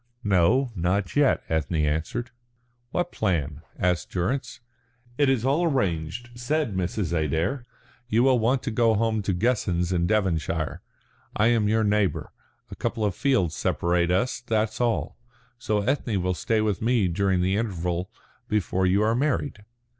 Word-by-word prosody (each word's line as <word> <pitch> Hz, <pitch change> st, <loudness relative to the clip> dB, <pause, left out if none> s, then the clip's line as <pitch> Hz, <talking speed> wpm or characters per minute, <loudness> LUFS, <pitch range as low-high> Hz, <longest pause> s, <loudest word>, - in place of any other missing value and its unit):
"No, 105 Hz, +7 st, +3 dB
not 90 Hz, +2 st, -1 dB
yet," 145 Hz, -2 st, +3 dB
Ethne 80 Hz, +1 st, -1 dB
answered. 80 Hz, +11 st, -2 dB, 0.6 s
"What 175 Hz, +6 st, -2 dB
plan?" 80 Hz, -8 st, -1 dB, 0.2 s
asked 90 Hz, -1 st, 0 dB
Durrance. 120 Hz, +7 st, -2 dB, 0.6 s
"It 145 Hz, -2 st, +4 dB
is 130 Hz, -3 st, +1 dB
all 140 Hz, +6 st, +2 dB
arranged," 105 Hz, -, -1 dB
said 120 Hz, +1 st, -1 dB
Mrs. 90 Hz, -1 st, -2 dB
Adair. 80 Hz, -, -1 dB, 0.4 s
"You 115 Hz, +2 st, +3 dB
will 130 Hz, -2 st, +4 dB
want 125 Hz, +4 st, +1 dB
to 135 Hz, -, -2 dB
go 115 Hz, 0 st, +3 dB
home 110 Hz, 0 st, +1 dB
to 100 Hz, -, -1 dB
Guessens 90 Hz, -4 st, 0 dB
in 85 Hz, -1 st, +1 dB
Devonshire. 85 Hz, -6 st, -1 dB, 0.5 s
I 110 Hz, +2 st, +3 dB
am 115 Hz, -3 st, +2 dB
your 110 Hz, +1 st, +2 dB
neighbour 105 Hz, -5 st, 0 dB, 0.4 s
a -, -, -6 dB
couple 115 Hz, -2 st, -2 dB
of 100 Hz, -, 0 dB
fields 95 Hz, -, +1 dB
separate 85 Hz, 0 st, 0 dB
us, 95 Hz, +9 st, +1 dB
that's 110 Hz, -1 st, -1 dB
all. 120 Hz, -1 st, -1 dB, 0.4 s
So 105 Hz, -3 st, 0 dB
Ethne 120 Hz, -3 st, 0 dB
will 90 Hz, 0 st, +1 dB
stay 110 Hz, +4 st, 0 dB
with 105 Hz, -3 st, -1 dB
me 115 Hz, -3 st, +2 dB
during 95 Hz, +1 st, +1 dB
the 95 Hz, +2 st, +1 dB
interval 90 Hz, -4 st, -2 dB, 0.4 s
before 95 Hz, -3 st, +1 dB
you 100 Hz, +3 st, +3 dB
are 110 Hz, +1 st, +2 dB
married." 135 Hz, -3 st, -1 dB
105 Hz, 155 wpm, -25 LUFS, 90-120 Hz, 0.6 s, It